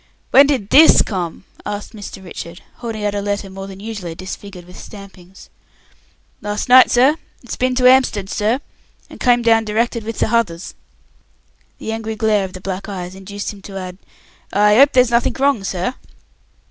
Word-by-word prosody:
"When 275 Hz, +1 st, +7 dB
did 255 Hz, -9 st, -1 dB
this 315 Hz, +3 st, +7 dB
come?" 180 Hz, -4 st, -5 dB, 0.2 s
asked 205 Hz, +2 st, -6 dB
Mr. 205 Hz, -2 st, -9 dB
Richard, 170 Hz, 0 st, -9 dB
holding 225 Hz, -3 st, -5 dB
out 205 Hz, -, 0 dB
a 205 Hz, -, -2 dB
letter 200 Hz, -1 st, -3 dB
more 195 Hz, 0 st, -8 dB
than 195 Hz, -1 st, -10 dB
usually 200 Hz, -6 st, -6 dB
disfigured 185 Hz, 0 st, -9 dB
with 180 Hz, -, -14 dB
stampings. 195 Hz, -3 st, -13 dB, 0.9 s
"Lars 210 Hz, 0 st, -3 dB
night, 255 Hz, +1 st, +7 dB
sir. 265 Hz, +6 st, +4 dB, 0.3 s
It's 245 Hz, -, -6 dB
bin 255 Hz, 0 st, 0 dB
to 255 Hz, -, 0 dB
'Amstead, 255 Hz, -6 st, +3 dB
sir, 220 Hz, +7 st, -1 dB, 0.5 s
and -, -, -12 dB
come 245 Hz, -1 st, +3 dB
down 225 Hz, -1 st, +4 dB
directed 225 Hz, +2 st, -1 dB
with 225 Hz, +1 st, -6 dB
the -, -, +1 dB
h'others." 215 Hz, -7 st, -1 dB, 1.0 s
The 220 Hz, -, -5 dB
angry 225 Hz, 0 st, -4 dB
glare 215 Hz, -2 st, +1 dB
of 185 Hz, -, -10 dB
the 185 Hz, -, -9 dB
black 195 Hz, +2 st, -5 dB
eyes 180 Hz, -2 st, -6 dB
induced 200 Hz, +2 st, -6 dB
him 200 Hz, -, -14 dB
to 195 Hz, 0 st, -9 dB
add, 185 Hz, 0 st, -7 dB, 0.5 s
"I 210 Hz, +2 st, +4 dB
'ope 280 Hz, +1 st, +6 dB
there's 250 Hz, -2 st, +4 dB
nothink 235 Hz, 0 st, +1 dB
wrong, 270 Hz, -6 st, +1 dB
sir." 185 Hz, +4 st, -2 dB
210 Hz, 175 wpm, -18 LUFS, 195-235 Hz, 1.0 s, When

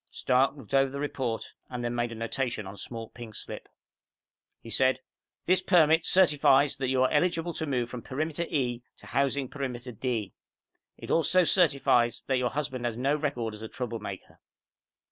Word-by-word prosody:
Stark 130 Hz, +2 st, +2 dB
looked 135 Hz, -, -12 dB
over 135 Hz, 0 st, +4 dB
the 140 Hz, +1 st, -6 dB
report 130 Hz, -5 st, -3 dB, 0.2 s
and 125 Hz, -1 st, -5 dB
then 120 Hz, -, -1 dB
made 120 Hz, -1 st, -1 dB
a -, -, -6 dB
notation 115 Hz, -1 st, -3 dB
on 95 Hz, -, -7 dB
a -, -, -13 dB
small 115 Hz, -2 st, -7 dB
pink 115 Hz, -3 st, -10 dB
slip. -, -, -8 dB, 0.9 s
He 115 Hz, -, -11 dB
said, 130 Hz, +4 st, +3 dB, 0.5 s
"This 185 Hz, +1 st, +3 dB
permit 165 Hz, -2 st, +4 dB
certifies 150 Hz, -6 st, +5 dB
that 135 Hz, -2 st, -2 dB
you 130 Hz, 0 st, +2 dB
are 130 Hz, -, +2 dB
eligible 170 Hz, +1 st, +1 dB
to 160 Hz, -, -3 dB
move 125 Hz, -4 st, 0 dB
from 125 Hz, 0 st, -7 dB
Perimeter 155 Hz, +7 st, -2 dB
E 125 Hz, -5 st, -1 dB, 0.2 s
to -, -, -17 dB
Housing 140 Hz, 0 st, 0 dB
Perimeter 125 Hz, -3 st, -5 dB
D. 115 Hz, -3 st, -3 dB, 0.6 s
It -, -, -7 dB
also 175 Hz, +3 st, +4 dB
certifies 140 Hz, -9 st, +3 dB
that 130 Hz, -2 st, +1 dB
your 125 Hz, -1 st, +1 dB
husband 135 Hz, -4 st, -3 dB
has 115 Hz, -2 st, -2 dB
no 135 Hz, +4 st, +1 dB
record 140 Hz, -7 st, -2 dB
as 105 Hz, -, -10 dB
a 110 Hz, -, -5 dB
troublemaker." 110 Hz, -5 st, -6 dB
130 Hz, 180 wpm, -28 LUFS, 120-145 Hz, 0.9 s, certifies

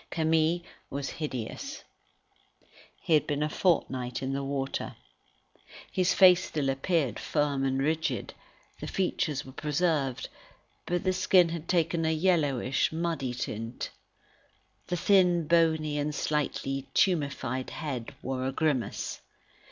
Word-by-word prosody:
Camille 160 Hz, +1 st, +2 dB, 0.3 s
was 140 Hz, 0 st, -3 dB
hideous. 155 Hz, -, -5 dB, 1.2 s
He 170 Hz, -, +1 dB
had 155 Hz, -, +4 dB
been 145 Hz, 0 st, 0 dB
a 155 Hz, -, 0 dB
fortnight 130 Hz, -8 st, 0 dB
in 135 Hz, +1 st, -1 dB
the 140 Hz, 0 st, -2 dB
water. 135 Hz, -1 st, -3 dB, 1.0 s
His 185 Hz, 0 st, +2 dB
face 180 Hz, -1 st, +6 dB
still 140 Hz, -3 st, -1 dB
appeared 135 Hz, -, 0 dB
firm 145 Hz, -3 st, 0 dB
and 135 Hz, 0 st, +1 dB
rigid; 155 Hz, +3 st, -1 dB, 0.5 s
the -, -, -5 dB
features 155 Hz, -7 st, -1 dB
were 135 Hz, -, -10 dB
preserved, 150 Hz, -2 st, 0 dB, 0.6 s
but 175 Hz, 0 st, 0 dB
the 185 Hz, -, +2 dB
skin 185 Hz, -1 st, +4 dB
had 165 Hz, -1 st, -5 dB
taken 170 Hz, -2 st, +1 dB
a 160 Hz, -, +2 dB
yellowish, 155 Hz, -7 st, +2 dB
muddy 160 Hz, -6 st, -2 dB
tint. 115 Hz, 0 st, -4 dB, 1.0 s
The 175 Hz, -, -1 dB
thin, 175 Hz, -2 st, +4 dB
bony, 160 Hz, -2 st, +2 dB
and 150 Hz, +1 st, -1 dB
slightly 135 Hz, -3 st, -1 dB
tumefied 140 Hz, -7 st, +1 dB
head, 135 Hz, -7 st, -5 dB
wore 130 Hz, 0 st, -2 dB
a -, -, -1 dB
grimace. 140 Hz, -4 st, -1 dB
150 Hz, 125 wpm, -29 LUFS, 135-170 Hz, 1.2 s, face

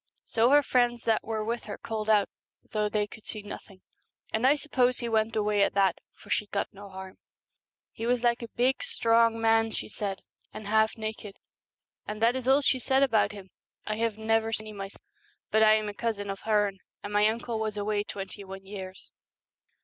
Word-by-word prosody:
So 230 Hz, +1 st, +3 dB
her 290 Hz, +1 st, +6 dB
friends 245 Hz, -3 st, +2 dB
that 225 Hz, -1 st, +2 dB
were 220 Hz, -1 st, -3 dB
with 235 Hz, +1 st, -3 dB
her 210 Hz, -, -6 dB
called 220 Hz, -1 st, -4 dB
out, 210 Hz, -2 st, +4 dB, 0.4 s
though 210 Hz, -1 st, 0 dB
they 210 Hz, 0 st, +1 dB
could 215 Hz, +1 st, -13 dB
see 215 Hz, -2 st, -6 dB
nothing, 195 Hz, -2 st, -10 dB, 0.5 s
and 220 Hz, +4 st, +3 dB
I 285 Hz, -, +6 dB
suppose 255 Hz, -4 st, +1 dB
he 240 Hz, -, -3 dB
went 220 Hz, 0 st, +1 dB
away 210 Hz, -1 st, +2 dB
at 200 Hz, -, +2 dB
that, 195 Hz, -3 st, +3 dB, 0.2 s
for -, -, -14 dB
she 210 Hz, -, +1 dB
got 200 Hz, -, -2 dB
no 200 Hz, 0 st, -11 dB
harm. 190 Hz, 0 st, -9 dB, 0.7 s
He 225 Hz, -, -5 dB
was 245 Hz, 0 st, +1 dB
like 240 Hz, 0 st, +2 dB
a 235 Hz, -, -5 dB
big 250 Hz, +3 st, +1 dB
strong 230 Hz, -, +3 dB
187 225 Hz, -, -5 dB, 0.2 s
man, 225 Hz, -, -5 dB
she -, -, -3 dB
said, 200 Hz, -2 st, -4 dB, 0.3 s
and 215 Hz, -, -8 dB
half 220 Hz, +2 st, +2 dB
naked, 215 Hz, -2 st, -6 dB, 0.7 s
and 210 Hz, 0 st, -4 dB
that 230 Hz, +2 st, +3 dB
is 260 Hz, -1 st, -3 dB
all 270 Hz, +2 st, +5 dB
she 260 Hz, -, +2 dB
said 265 Hz, +2 st, +3 dB
about 220 Hz, -6 st, +3 dB
him. 195 Hz, -2 st, -11 dB, 0.3 s
I 215 Hz, 0 st, -2 dB
have 225 Hz, -2 st, 0 dB
never 225 Hz, 0 st, +1 dB
seen 215 Hz, -1 st, -3 dB
any 215 Hz, -, -8 dB
myself, 195 Hz, -1 st, -8 dB, 0.5 s
but 220 Hz, -, +4 dB
I 215 Hz, 0 st, +7 dB
am 215 Hz, -1 st, -1 dB
a 205 Hz, -, -4 dB
cousin 205 Hz, -2 st, -2 dB
of 195 Hz, -, -6 dB
Hearne, 205 Hz, -3 st, +2 dB, 0.2 s
and 205 Hz, -, -5 dB
my 210 Hz, +1 st, +5 dB
uncle 230 Hz, +1 st, -2 dB
was 215 Hz, -1 st, -2 dB
away 205 Hz, 0 st, 0 dB
twenty 195 Hz, -1 st, -7 dB
one 195 Hz, 0 st, -9 dB
years.' 190 Hz, -1 st, -9 dB
215 Hz, 210 wpm, -28 LUFS, 205-230 Hz, 0.7 s, I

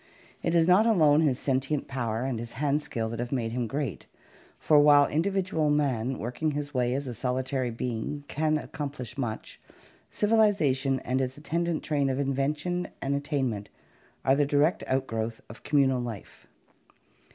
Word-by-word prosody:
It 170 Hz, -, 0 dB
is 165 Hz, -1 st, +4 dB
not 190 Hz, +5 st, +5 dB
alone 155 Hz, -8 st, +5 dB
his 140 Hz, -6 st, +2 dB
sentient 135 Hz, +2 st, -1 dB
power 120 Hz, -4 st, -2 dB
and 130 Hz, -3 st, -2 dB
his 120 Hz, 0 st, -7 dB
hand 145 Hz, +1 st, 0 dB
skill 115 Hz, -6 st, -3 dB
that 115 Hz, 0 st, -5 dB
have 120 Hz, 0 st, -3 dB
made 120 Hz, -4 st, -1 dB
him 120 Hz, 0 st, -2 dB
great, 135 Hz, -2 st, -4 dB, 0.5 s
for 150 Hz, -2 st, +4 dB
while 145 Hz, -1 st, +7 dB
in 155 Hz, -, 0 dB
dividual 185 Hz, -5 st, 0 dB
man 135 Hz, -4 st, 0 dB
working 125 Hz, +8 st, -2 dB
his 145 Hz, 0 st, -4 dB
way 125 Hz, -1 st, +1 dB
as 140 Hz, +1 st, -2 dB
a 125 Hz, -, -4 dB
solitary 130 Hz, +2 st, -1 dB
being 120 Hz, +4 st, -4 dB
can 155 Hz, +1 st, +1 dB
accomplish 145 Hz, -5 st, -6 dB
much, 120 Hz, -6 st, -5 dB, 0.5 s
civilization 195 Hz, -12 st, +2 dB
and 130 Hz, +2 st, -1 dB
its 130 Hz, +1 st, -3 dB
attendant 170 Hz, +2 st, -2 dB
train 145 Hz, -3 st, 0 dB
of 130 Hz, -, -1 dB
invention 150 Hz, +6 st, -1 dB
and 140 Hz, +1 st, -1 dB
attain 140 Hz, -2 st, -1 dB
ment 105 Hz, -1 st, -7 dB, 0.6 s
are 135 Hz, -, +5 dB
the 145 Hz, -, +3 dB
direct 145 Hz, +4 st, +2 dB
outgrowth 115 Hz, -4 st, -2 dB
of 110 Hz, -, -12 dB
communal 135 Hz, -4 st, +2 dB
life. 115 Hz, -5 st, -8 dB
140 Hz, 165 wpm, -28 LUFS, 125-150 Hz, 0.6 s, while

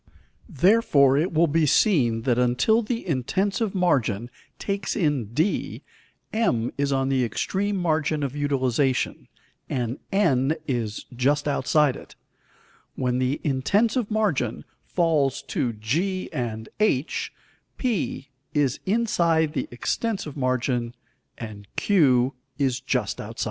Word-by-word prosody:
Therefore 155 Hz, -, +4 dB
it 160 Hz, +6 st, +1 dB
will 165 Hz, +1 st, +4 dB
be 160 Hz, 0 st, +2 dB
seen 135 Hz, -, +3 dB
that 125 Hz, -1 st, +1 dB
until 125 Hz, -, +3 dB
the 230 Hz, -1 st, -4 dB
intensive 190 Hz, -, -1 dB
margin 125 Hz, -, +1 dB, 0.3 s
takes 200 Hz, -1 st, -3 dB
in 150 Hz, -, +1 dB
d, 160 Hz, -, -1 dB, 0.5 s
M 125 Hz, -, +1 dB
is 140 Hz, 0 st, 0 dB
on 135 Hz, 0 st, +1 dB
the 130 Hz, -2 st, +2 dB
extreme 195 Hz, -, -1 dB
margin 155 Hz, -3 st, 0 dB
of 140 Hz, 0 st, -3 dB
utilization, 135 Hz, -2 st, 0 dB, 0.4 s
and 125 Hz, 0 st, -2 dB
N 155 Hz, -7 st, +2 dB
is 115 Hz, -6 st, -3 dB
just 145 Hz, +4 st, +1 dB
outside 145 Hz, 0 st, +2 dB
it; -, -, -12 dB, 0.8 s
when 125 Hz, -1 st, 0 dB
the 130 Hz, +2 st, 0 dB
intensive 205 Hz, -, +1 dB
margin 195 Hz, -, 0 dB, 0.2 s
falls 160 Hz, -6 st, +1 dB
to 120 Hz, -, -1 dB
g 165 Hz, -, -2 dB
and 110 Hz, -3 st, -3 dB
h, 165 Hz, -10 st, 0 dB, 0.5 s
P 190 Hz, -, -2 dB, 0.3 s
is 140 Hz, -3 st, +1 dB
inside 170 Hz, -8 st, +2 dB
the -, -, -2 dB
extensive 190 Hz, -, -3 dB
margin, 125 Hz, -2 st, -1 dB, 0.4 s
and 105 Hz, -3 st, -8 dB
Q 135 Hz, -9 st, +3 dB, 0.2 s
is 135 Hz, -3 st, 0 dB
just 130 Hz, -, -2 dB
outside. -, -, -9 dB
145 Hz, 120 wpm, -24 LUFS, 125-185 Hz, 0.8 s, Therefore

